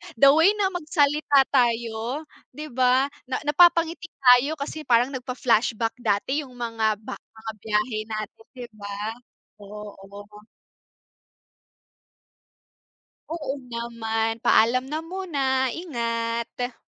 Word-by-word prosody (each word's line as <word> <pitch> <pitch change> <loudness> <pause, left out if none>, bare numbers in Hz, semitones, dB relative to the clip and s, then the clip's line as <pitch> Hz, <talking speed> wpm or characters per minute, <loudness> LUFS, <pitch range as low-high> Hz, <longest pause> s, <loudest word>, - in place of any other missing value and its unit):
The 275 +4 +7
way 325 +8 +5
na 390 -2 +1
magsalita 300 -4 +2
tayo, 235 +2 0 0.3
di 300 0 -8
ba? 255 +2 +3 0.2
Na 255 - -2
napapangiti 335 +2 +3 0.2
tayo 250 +5 +6
kasi 305 +1 -6
parang 245 +2 +3
nagfa-flashback 245 -2 0
dati 245 +7 0
yung 250 - -16
mga 230 -3 0
ba - - -6
mga 220 0 -9
biyahe 215 +2 -1
natin, 215 0 -6
di 245 -1 -7
ba? 205 -1 -10 0.7
Oo. 205 0 -11 2.9
Oo 300 -5 -3 0.2
naman. 225 -1 -2
Paalam 255 +3 +4
na 310 +2 -2
muna, 280 -8 -1
ingat. 235 -5 -3
245 Hz, 105 wpm, -24 LUFS, 225-290 Hz, 2.9 s, The